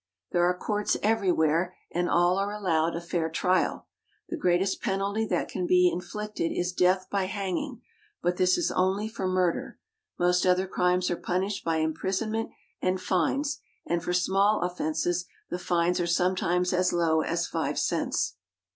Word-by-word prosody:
There 175 0 +3
are 180 0 +1
courts 210 +2 0
everywhere, 180 -5 +2 0.2
and 175 +1 0
all 175 +2 +3
are 200 +1 -1
allowed 170 -6 0
a - - -2
fair 170 -1 -1
trial. 180 +3 0 0.4
The - - -2
greatest 190 - +1
penalty 200 +3 -1
that - - 0
can 180 -2 -3
be 180 0 +5
in 180 - -3
flicted 210 -4 -4
is 180 +1 -1
death 185 +1 +2
by 195 -2 +1
hanging, 205 - -3 0.4
but 180 0 0
this 185 0 +3
is - - 0
only 190 +3 +1
for 215 -4 -3
murder. 185 -2 0 0.4
Most 180 0 +2
other 185 +1 +3
crimes 180 -1 +1
are - - +1
punished 190 +4 -2
by 165 -1 0
imprisonment 190 +8 -1 0.3
and 185 0 +1
fines, 190 - 0 0.3
and 170 0 -1
for 180 - -2
small 195 +4 +2
offenses 175 0 -1 0.3
the 175 - -2
fines 175 0 +1
are 175 - 0
som.etimes 180 0 +1
as 180 0 +2
low 165 -2 +2
as 170 +1 -1
five - - -2
cents. - - 0
180 Hz, 165 wpm, -27 LUFS, 175-195 Hz, 0.4 s, be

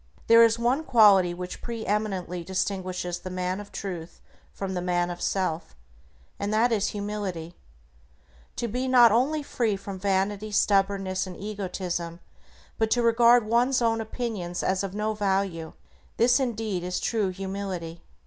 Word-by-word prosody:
There 230 0 +7
is 230 0 +4
one 245 +6 +1
quality 210 - +5
which 180 +1 -7
pre 230 -2 -5
eminently 190 -4 -2
distinguishes 185 -1 -3
the 185 - -7
man 185 +1 -2
of 205 0 -10
Truth 175 -4 -6 0.3
from 195 -1 -5
the 180 - -2
man 175 0 0
of 175 - -8
self, 165 - -2 0.6
and 200 +1 -2
that 225 +3 +3
is 210 -3 +1
humility. 200 -5 -4 1.0
To 235 - -2
be 250 +4 -2
not 245 -3 +7
only 285 +7 +1
free 230 -6 0
from 195 -1 -7
vanity, 200 +2 0
stubbornness 195 -2 +1
and 180 - -8
egotism, 180 -4 -4 0.6
but 220 -1 +2
to 240 +1 +2
regard 235 0 +5
one's 240 +4 +2
own 225 -1 +1
opinions 215 -6 -4
as 190 +1 0
of 195 0 -5
no 215 +1 -1
value, 195 -5 -1 0.4
this 245 +3 +4
indeed 220 -7 -2
is 180 0 -2
true 215 -4 0
humility. 190 -3 -5
200 Hz, 150 wpm, -26 LUFS, 185-225 Hz, 1.0 s, There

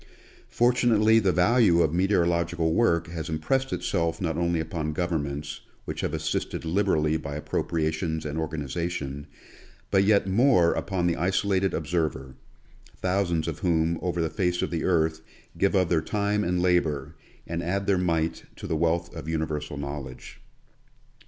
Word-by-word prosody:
Fortunately 115 -2 +4
the 95 -4 +2
value 90 -1 +4
of 80 -1 0
meteorological 85 -3 +1
work 85 -6 +2
has 80 -1 -5
impressed 130 +13 -1
itself 85 -3 -1
not 80 -4 -1
only 85 0 0
upon 80 -1 -3
governments, 75 -4 -3 0.2
which - - -4
have - - -1
assisted - - -3
liberally 80 -3 +1
by 70 -2 -6
appropriations 80 +1 -2
and 75 +1 -3
organization, 75 -1 -4 0.6
but 95 0 +4
yet 100 -1 +4
more 95 -3 +4
upon 95 -3 -2
the 85 -1 +2
isolated 95 +1 +1
observer, 75 -5 -2 0.6
thousands 90 -4 0
of 80 - -4
whom 85 -2 +1
over 85 -1 -1
the 80 - -1
face 90 0 0
of - - -2
the 85 -2 -2
earth 80 -3 +1 0.3
give 100 +1 +1
of 95 -3 +2
their 80 -3 +2
time 105 +4 0
and 90 0 0
labor, 80 -5 +1 0.3
and 85 0 -3
add 95 +4 -1
their 100 -2 +2
mite 85 -2 -1
to - - -9
the - - -1
wealth 85 +2 0
of 80 -1 -6
universal 80 -2 -3
knowledge. 70 -2 -7
85 Hz, 150 wpm, -26 LUFS, 80-95 Hz, 0.6 s, Fortunately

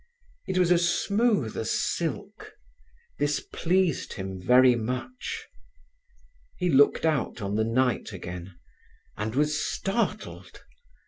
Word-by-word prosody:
It 190 -1 -1
was 180 -1 +3 0.3
smooth 205 - +1
as 110 - -3
silk. 190 +5 -3 0.7
This - - +1
pleased 185 - 0
him 95 -1 -6
very 125 +5 +6
much. 125 - -4 1.1
He 180 -1 0
looked 145 +3 +4
out 155 -5 0
on 100 -1 -3
the 110 +1 +2
night 125 +1 0
again, 90 -1 -8 0.6
and 110 +2 -3
was 150 +1 +1
startled. 195 +4 -3
130 Hz, 110 wpm, -27 LUFS, 110-180 Hz, 1.1 s, very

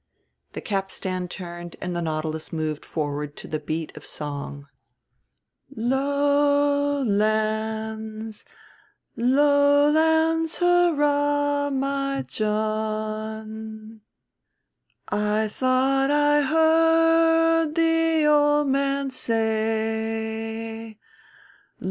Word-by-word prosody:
The - - -6
capstan 190 -2 -3
turned 175 -1 -8
and 180 -1 -4
the 170 - -2
Nautilus 155 -1 -4
moved 155 -2 -3
forward 145 -1 -4
to - - -9
the 155 - -3
beat 155 +1 -5
of - - -11
song. 145 -1 -7 1.1
"Low 285 +3 +1
lands, 220 0 -2 0.7
low 285 +3 +4
lands, 320 +1 +2
hurrah, 290 -5 +2
my 275 0 -1
John, 215 0 -4 1.1
I 210 +1 0
thought 260 +4 +1
I 295 0 +3
heard 325 +1 +3
the 325 -1 +2
old 295 -1 +3
man 275 0 0
say. 225 -1 -2
225 Hz, 75 wpm, -24 LUFS, 215-290 Hz, 1.1 s, low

